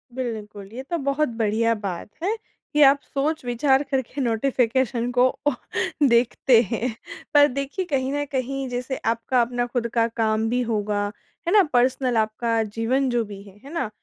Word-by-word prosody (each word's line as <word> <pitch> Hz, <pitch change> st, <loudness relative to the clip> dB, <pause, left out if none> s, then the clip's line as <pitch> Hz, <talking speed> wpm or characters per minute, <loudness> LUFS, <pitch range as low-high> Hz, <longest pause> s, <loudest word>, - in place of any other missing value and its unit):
बिल्कुल 210 Hz, -5 st, -5 dB
ये 260 Hz, -, -6 dB
तो 340 Hz, -, 0 dB
बहुत 280 Hz, 0 st, 0 dB
बढ़िया 225 Hz, +1 st, +2 dB
बात 200 Hz, -3 st, -5 dB
है 420 Hz, +4 st, +1 dB, 0.4 s
कि 300 Hz, -, +3 dB
आप 280 Hz, 0 st, +7 dB
सोच-विचार 275 Hz, -2 st, +1 dB
करके 270 Hz, +1 st, -1 dB
नोटिफिकेशन 245 Hz, 0 st, +1 dB
को 250 Hz, +1 st, +4 dB, 0.2 s
ओ -, -, +5 dB, 0.6 s
देखते 235 Hz, 0 st, +4 dB
हैं। 235 Hz, -1 st, -1 dB, 0.4 s
पर 290 Hz, 0 st, +7 dB
देखिए 275 Hz, +8 st, -3 dB
कहीं 270 Hz, -4 st, -1 dB
न 290 Hz, 0 st, 0 dB
कहीं 270 Hz, +1 st, -2 dB
जैसे 250 Hz, +2 st, -3 dB
आपका 230 Hz, +2 st, +1 dB
अपना 245 Hz, +1 st, 0 dB
ख़ुद 240 Hz, -1 st, -1 dB
का 230 Hz, -1 st, +3 dB
काम 225 Hz, -1 st, 0 dB
भी 250 Hz, +1 st, +1 dB
होगा 210 Hz, -3 st, -1 dB, 0.4 s
है 355 Hz, -, +2 dB
ना? 415 Hz, -, +7 dB
पर्सनल 250 Hz, 0 st, +2 dB
आपका 225 Hz, +1 st, +1 dB
जीवन 230 Hz, +5 st, 0 dB
जो 240 Hz, -1 st, +1 dB
भी 200 Hz, -1 st, -9 dB
है। 200 Hz, -1 st, -16 dB
है 280 Hz, +4 st, -10 dB
ना? 330 Hz, -10 st, -1 dB
245 Hz, 165 wpm, -24 LUFS, 225-270 Hz, 0.6 s, आप